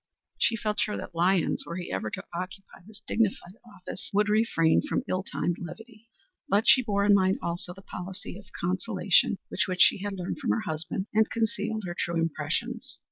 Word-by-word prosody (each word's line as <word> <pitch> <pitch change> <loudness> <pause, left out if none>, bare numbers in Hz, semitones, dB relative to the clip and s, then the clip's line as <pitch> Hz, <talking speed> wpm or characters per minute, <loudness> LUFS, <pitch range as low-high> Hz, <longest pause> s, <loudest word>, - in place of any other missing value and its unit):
She 230 - +3
felt 210 -1 -2
sure 210 - 0
that - - -7
Lyons, 175 +1 +2
were 170 - -6
he 175 -1 -5
ever 100 +3 -2
to - - -6
occupy 185 +3 -7
this 220 -1 -11
dignified 200 -4 0
office, 205 -6 -7
would 210 +1 +2
refrain 210 -7 +3
from 295 - -2
ill 185 - 0
timed 175 -2 -2
levity, 225 +6 -10 0.4
but 205 +4 +3
she 265 0 +8
bore 200 -4 0
in 205 - +6
mind 190 -1 +3
also 170 +1 -2
the 195 +2 -12
policy 185 0 -7
of 200 -1 -12
conciliation 185 +1 +2
which - - +1 0.2
she - - +6
had 205 +1 -3
learned 185 +5 -4
from 275 - -3
her 225 - +2
husband, 165 0 +1
and 220 +1 +3
concealed 220 -1 -1
her 175 -1 -4
true 170 0 -2
impressions. 165 -2 -2
195 Hz, 190 wpm, -28 LUFS, 175-215 Hz, 0.4 s, she